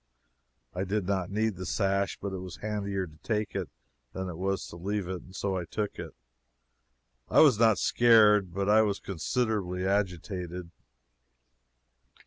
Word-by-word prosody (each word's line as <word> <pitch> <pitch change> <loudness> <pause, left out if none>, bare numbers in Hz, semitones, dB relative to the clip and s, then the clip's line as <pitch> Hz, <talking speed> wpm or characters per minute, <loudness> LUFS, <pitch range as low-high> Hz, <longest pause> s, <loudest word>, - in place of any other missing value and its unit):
I 90 - -2
did 100 0 -1
not 95 -2 -1
need 110 -1 0
the 95 - -5
sash, 100 -1 0
but 100 -1 -4
it 95 - -4
was 90 -1 -7
handier 100 -3 -3
to 80 -3 -15
take 105 +5 -2
it - - -2 0.4
than 95 0 -4
it 85 - -6
was 95 +1 -2
to - - -10
leave 100 +2 -3
it, 95 -1 -4
and 95 - -15
so 100 -1 -1
I 90 -2 -3
took 105 +3 -4
it. - - -7 1.1
I - - +6
was 135 -9 +6
not 110 -3 +5
scared, 105 -5 +5
but 100 +2 -2
I 105 +1 +6
was 100 -2 0
considerably 95 -1 -2
agitated. 90 -2 -2
100 Hz, 160 wpm, -29 LUFS, 90-105 Hz, 1.1 s, I